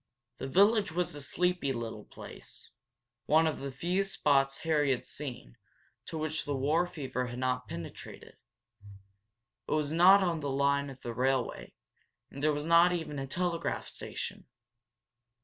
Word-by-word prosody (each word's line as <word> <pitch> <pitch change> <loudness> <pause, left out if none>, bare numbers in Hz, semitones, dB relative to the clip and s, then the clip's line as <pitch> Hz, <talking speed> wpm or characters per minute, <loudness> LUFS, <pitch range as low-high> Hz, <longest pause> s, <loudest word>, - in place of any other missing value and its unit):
The - - -4
village 200 +5 +4
was 175 +1 -1
a 145 - -7
sleepy 180 -1 0
little 115 -3 -5
place, - - -11 0.6
one 160 +2 +5
of 160 - -1
the 140 0 -5
few 175 +8 0
spots 135 -7 +2
Harry 150 -3 +1
had 130 -2 0
seen 120 - -7 0.5
to 160 - -5
which 155 0 -2
the 145 - -2
war 155 +6 +2
fever 130 -6 -4
had 120 0 -6
not 125 0 -1
penetrated. 85 0 -9 1.3
It - - -6
was 150 -1 0
not 190 +4 +7
on 170 -3 0
the 145 -2 -3
line 140 +1 +1
of 135 -1 -12
the 120 - -4
railway, 130 +1 -1 0.6
and 140 - -8
there 155 +1 +3
was 145 0 -3
not 170 +2 +6
even 160 -5 -3
a 135 - -4
telegraph 170 +2 -2
station. - - -6
145 Hz, 155 wpm, -31 LUFS, 135-170 Hz, 1.3 s, not